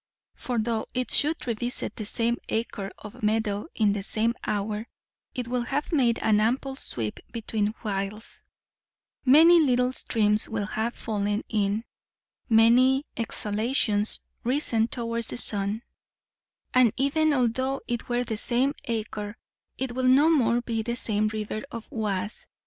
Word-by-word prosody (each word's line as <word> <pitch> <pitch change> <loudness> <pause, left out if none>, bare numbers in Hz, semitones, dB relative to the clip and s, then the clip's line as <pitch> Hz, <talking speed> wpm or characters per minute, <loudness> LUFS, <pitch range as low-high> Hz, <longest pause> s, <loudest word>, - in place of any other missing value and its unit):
For 245 -1 -4
though 225 0 -1
it 255 0 -1
should 310 +3 +2
revisit 240 +1 -3
the 215 -3 -3
same 235 +2 +1
acre 220 -3 -2
of 210 - -11
meadow 210 +1 0
in 210 -3 +3
the 205 - -2
same 220 +3 +1
hour, 210 +2 -2 0.5
it 250 -2 -3
will 250 0 -1
have 285 +7 -2
made 245 -6 +3
an 215 -1 +4
ample 260 +4 0
sweep 110 - -4
between 220 -2 -2
whiles; 205 +1 -4 0.8
many 325 +6 +8
little 250 -4 +3
streams 215 -4 +1
will 220 -2 -2
have 220 +3 -2
fallen 210 -1 -2
in; 210 0 0 0.7
many 250 +5 +5
exhalations 215 -1 0 0.2
risen 235 -3 +1
towards 235 -1 -2
the - - -3
sun; 205 0 +2 0.9
and 250 -4 +5
even 305 +3 +2
although 260 +1 0
it 240 0 -3
were 245 0 +1
the 230 -3 -4
same 255 +5 +1
acre, 215 -2 -4 0.4
it 260 -1 -2
will 255 +1 0
no 285 +5 +6
more 240 -6 +3
be 230 -2 -2
the 235 +2 -3
same 215 -3 +1
river 215 0 -4
of 230 -5 -8
Oise. 205 -2 -3
230 Hz, 145 wpm, -26 LUFS, 215-250 Hz, 0.9 s, many